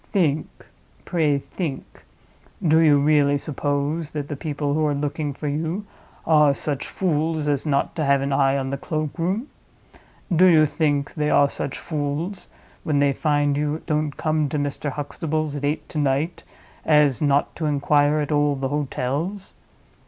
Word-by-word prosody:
Think; 155 -6 -1 0.4
pray 155 -5 +1
think! 140 0 -6 0.6
Do 160 +1 +5
you 155 -3 +5
really 145 -1 +3
suppose 145 +2 -2
that 145 -2 -5
the 150 - -3
people 145 -1 -2
who 155 +1 +1
are 145 - 0
looking 145 +1 -2
for 150 +2 -6
you 160 +7 -2 0.4
are 150 -3 +5
such 140 -1 -3
fools 160 -3 -1
as 145 +1 0
not 140 -1 0
to 155 - 0
have 140 0 +3
an 140 0 -1
eye 135 0 +3
on 135 -1 -3
the 140 - -2
cloakroom? 165 - -2 0.9
Do 185 +3 +6
you 160 -3 +6
think 145 -2 0
they 150 -1 -1
are 140 -1 +4
such 140 - -4
fools—when 155 +1 -4
they 140 -1 +3
find 145 -1 +1
you 150 +2 -2
don't 150 -2 -1
come 155 -2 0
to 150 - -2
Mr. 145 0 -2
Huxtable's 150 +1 -3
at 145 - -5
eight 150 +2 -1
to 155 - -3
night—as 145 -1 0
not 145 -1 +1
to 160 - -1
inquire 145 +1 +2
at 150 - -3
all 145 -1 +2
the 135 -1 -2
hotels? 150 +7 -3
150 Hz, 160 wpm, -23 LUFS, 140-155 Hz, 0.9 s, Do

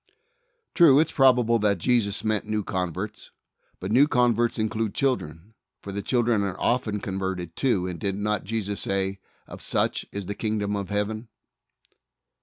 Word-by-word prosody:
True, 160 -7 +7
it 160 +1 +2
is - - -8
probable 125 -4 +4
that 100 -2 +2
Jesus 105 0 +1
meant 110 -1 0
new 105 0 -1
converts, 95 +4 -4 0.5
but 95 +2 -5
new 135 +6 +5
con 125 -4 +3
verts 120 +1 0
include 110 -1 -1
children, 105 - -2 0.3
for 100 - -6
the 100 +1 -3
children 120 -2 +1
are 95 -2 -4
often 115 -4 0
converted, 95 -3 -4
too, 110 -9 +1
and 90 -2 -5
did 100 -1 -2
not 105 0 -1
Jesus 105 -1 -2
say, 95 0 -1 0.3
"Of - - -10
such - - 0
is 100 -1 -5
the 100 - -3
Kingdom 105 -1 -2
of 100 -2 -4
Heaven"? 105 +3 -2
105 Hz, 165 wpm, -25 LUFS, 95-115 Hz, 0.5 s, True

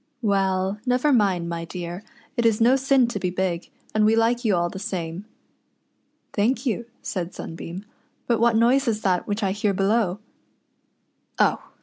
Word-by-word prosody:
Well, 195 -1 +1
never 255 +4 +2
mind, 195 -7 +2
my 170 0 -4
dear, 175 +2 -6 0.3
it 240 - +1
is 225 -2 +3
no 240 +3 +5
sin 270 -2 +3
to 205 - -3
be 185 - -1
big, 180 -1 -2 0.2
and 215 - +3
we 215 +1 +4
like 235 +2 +2
you 210 -5 +3
all 175 0 +1
the 190 - -7
same." 180 -1 -4 0.5
" - - -47
Thank 235 +5 +1
you," 235 -1 -1 0.2
said 180 -2 -4
Sunbeam; 170 +4 -7 0.2
" - - -43
but 235 -2 +1
what 235 0 +4
noise 245 +4 +3
is 220 -2 0
that 180 -2 +1
which 205 +1 -2
I 195 - +1
hear 205 0 0
below 195 -1 +1 0.3
} - - -45
" - - -47 0.3
"Oh! - - +3
205 Hz, 190 wpm, -24 LUFS, 185-235 Hz, 0.5 s, no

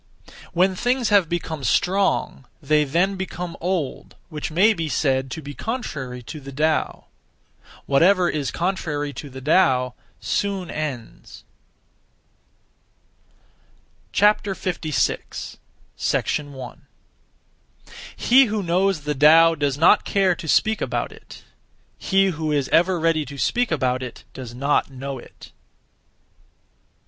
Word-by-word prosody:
When 185 +2 +2
things 245 +5 0
have 200 -6 +4
become 160 -4 -4
strong, 185 -7 0
they 150 0 +2
(then) 180 +7 +1
become 180 -2 -5
old, 175 -5 -3
which 150 -1 -5
may 190 +8 +4
be 165 -5 -3
said 135 -1 0
to 155 +5 -6
be 145 +1 -7
contrary 140 - -5
to 155 +6 -8
the 140 -1 -10
Tao. 155 +3 -1 0.8
Whatever 180 +6 +4
is 150 -5 -2
contrary 155 -5 -2
to 145 +3 -8
the 130 0 -9
Tao 130 -5 +2 0.3
soon 195 -3 -2
ends. 140 -7 -6 2.7
56. 190 -6 0 0.8
1. 135 -4 -10 1.3
He 265 +3 +5
who 215 -2 -2
knows 180 0 +1
(the 150 +1 -2
Tao) 160 +4 +6
does 145 -3 -1
not 170 +7 +5
(care 195 -2 +2
to) 170 -1 -8
speak 220 +7 +2
(about - - -2
it); - - -14 0.6
he 195 0 +2
who 155 -3 -3
is 145 -3 0
(ever 175 +1 +3
ready 165 -1 +1
to) 140 +1 -9
speak 235 - 0
about 130 -5 0
it 125 -2 -8
does 120 -3 -8
not 140 +3 +1
know 135 0 -6
it. - - -15
160 Hz, 120 wpm, -22 LUFS, 140-190 Hz, 2.7 s, Tao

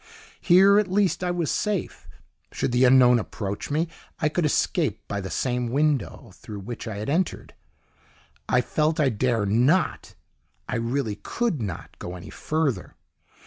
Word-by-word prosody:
Here, 195 +3 +6
at 210 - 0
least, 190 -1 +1
I 180 - 0
was 175 -3 -1
safe! 210 -4 -2 0.4
Should - - -2
the 125 +2 +4
Unknown 125 -1 +6
approach 100 -2 -5
me, 155 +4 0 0.3
I 155 - +2
could 165 +2 0
escape 150 - 0
by 100 0 -3
the 95 - -6
same 125 +6 -1
window 140 -1 -1
through 105 -2 -9
which 120 +4 -7
I 110 -3 -5
had 105 - -5
entered. 170 +5 -1 1.0
I 125 - +4
felt 155 +5 0
I 145 -3 +4
dare 115 -1 0
not! 125 - +1 0.5
I 125 - -2
really 115 -2 -2
COULD 230 - -1
not 95 -6 -6
go 90 - -6
any 90 - -10
further. 150 - -2
130 Hz, 155 wpm, -25 LUFS, 110-165 Hz, 1.0 s, Here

